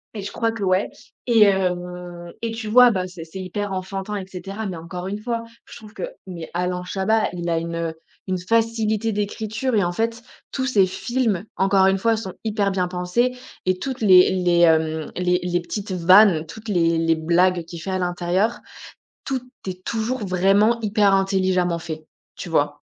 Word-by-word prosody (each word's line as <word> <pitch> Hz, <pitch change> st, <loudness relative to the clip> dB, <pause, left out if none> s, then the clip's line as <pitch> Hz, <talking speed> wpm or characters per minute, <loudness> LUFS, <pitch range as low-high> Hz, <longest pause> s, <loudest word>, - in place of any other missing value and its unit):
Et 205 Hz, -, -4 dB
je 200 Hz, -, -6 dB
crois 230 Hz, -1 st, -1 dB
que 225 Hz, -3 st, -5 dB
ouais 185 Hz, +1 st, +2 dB, 0.4 s
et 230 Hz, -2 st, +4 dB
hem, 180 Hz, -3 st, 0 dB
et 230 Hz, -1 st, -2 dB
tu 225 Hz, -1 st, -5 dB
vois? 250 Hz, +2 st, +8 dB
Bah 185 Hz, -5 st, -1 dB
c'est 180 Hz, -3 st, -9 dB
c'est 190 Hz, +4 st, -8 dB
hyper 195 Hz, +2 st, -4 dB
enfantin 195 Hz, +2 st, -4 dB
et 195 Hz, -2 st, -4 dB
cetera 195 Hz, +3 st, -7 dB
mais 185 Hz, -4 st, -4 dB
encore 180 Hz, +2 st, -7 dB
une 205 Hz, +2 st, -4 dB
fois 230 Hz, 0 st, -2 dB, 0.2 s
je -, -, -12 dB
trouve 215 Hz, -2 st, -13 dB
que -, -, -7 dB, 0.2 s
mais 170 Hz, -4 st, -8 dB
Alain 180 Hz, +1 st, -2 dB
Chabat 210 Hz, +4 st, +1 dB
il 175 Hz, -1 st, -4 dB
a 165 Hz, -, +1 dB
une, 165 Hz, +1 st, -3 dB
heu, 165 Hz, -1 st, -3 dB, 0.3 s
une 185 Hz, -, 0 dB
facilité 225 Hz, +2 st, +1 dB
d'écriture 220 Hz, +4 st, -2 dB
et 205 Hz, -, +3 dB
en 175 Hz, -, 0 dB
fait 230 Hz, +5 st, -2 dB, 0.3 s
tous 260 Hz, -, -1 dB
ces 205 Hz, -8 st, +4 dB
films 225 Hz, -1 st, -1 dB
encore 195 Hz, 0 st, +4 dB
une 195 Hz, 0 st, +3 dB
fois 225 Hz, +3 st, +2 dB
sont 195 Hz, -4 st, -6 dB
hyper 205 Hz, -2 st, 0 dB
bien 185 Hz, -2 st, 0 dB
pensés 180 Hz, +8 st, 0 dB, 0.3 s
et 185 Hz, 0 st, +1 dB
toutes 260 Hz, +5 st, -4 dB
les 185 Hz, -4 st, +6 dB
les, 180 Hz, -2 st, +2 dB
hem, 160 Hz, -2 st, +2 dB
les 180 Hz, 0 st, +1 dB
les 175 Hz, 0 st, 0 dB
petites 200 Hz, +3 st, -5 dB
vannes, 185 Hz, -1 st, +5 dB
toutes 220 Hz, +6 st, -10 dB
les 170 Hz, -4 st, +2 dB
les 165 Hz, 0 st, +2 dB
blagues 175 Hz, +2 st, +2 dB
qu'il 170 Hz, -1 st, -9 dB
fait 195 Hz, -, -4 dB
à 185 Hz, -, -1 dB
l'intérieur, 180 Hz, +5 st, 0 dB, 0.6 s
tout 265 Hz, -2 st, -2 dB, 0.3 s
est 185 Hz, 0 st, -6 dB
toujours 230 Hz, +1 st, -2 dB
vraiment 195 Hz, +5 st, +3 dB
hyper 205 Hz, -2 st, +3 dB
intelligemment 185 Hz, -3 st, +1 dB
fait, 160 Hz, -2 st, -7 dB, 0.3 s
tu -, -, -7 dB
vois? 145 Hz, -2 st, 0 dB
190 Hz, 190 wpm, -22 LUFS, 175-215 Hz, 0.6 s, vois